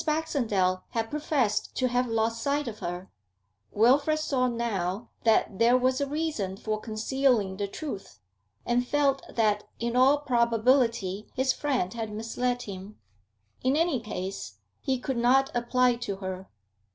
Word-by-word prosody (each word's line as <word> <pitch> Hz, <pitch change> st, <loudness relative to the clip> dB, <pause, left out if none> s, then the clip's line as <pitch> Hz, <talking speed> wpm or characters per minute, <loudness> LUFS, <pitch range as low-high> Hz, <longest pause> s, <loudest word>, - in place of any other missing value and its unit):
Baxendale 235 Hz, -, 0 dB
had 225 Hz, -1 st, -2 dB
professed 290 Hz, -8 st, 0 dB
to 255 Hz, -, +1 dB
have 250 Hz, 0 st, +1 dB
lost 225 Hz, 0 st, 0 dB
sight 285 Hz, +1 st, 0 dB
of 215 Hz, -2 st, -6 dB
her; 175 Hz, +2 st, -5 dB, 0.6 s
Wilfrid 280 Hz, +8 st, +3 dB
saw 265 Hz, -4 st, +1 dB
now 230 Hz, -3 st, -2 dB, 0.2 s
that 220 Hz, -3 st, +3 dB
there 235 Hz, +2 st, +5 dB
was 255 Hz, +1 st, +1 dB
a 280 Hz, -, 0 dB
reason 290 Hz, -11 st, -2 dB
for 215 Hz, +1 st, -2 dB
concealing 220 Hz, -2 st, 0 dB
the 200 Hz, 0 st, -2 dB
truth, 200 Hz, -, -7 dB, 0.5 s
and 245 Hz, +1 st, +1 dB
felt 280 Hz, -1 st, +2 dB
that 210 Hz, -2 st, +1 dB
in 235 Hz, +1 st, -2 dB
all 265 Hz, +3 st, +5 dB
probability 235 Hz, -5 st, +1 dB
his 260 Hz, 0 st, +2 dB
friend 255 Hz, -10 st, -1 dB
had 225 Hz, -2 st, -4 dB
misled 245 Hz, +3 st, -2 dB
him; 200 Hz, 0 st, -8 dB, 0.6 s
in 260 Hz, +2 st, +2 dB
any 325 Hz, -4 st, +2 dB
case, 190 Hz, -, -5 dB, 0.2 s
he 265 Hz, -1 st, 0 dB
could 255 Hz, 0 st, -3 dB
not 260 Hz, +3 st, +3 dB
apply 245 Hz, +1 st, +2 dB
to 205 Hz, -5 st, -4 dB
her. 190 Hz, -1 st, -6 dB
235 Hz, 145 wpm, -27 LUFS, 210-265 Hz, 0.6 s, there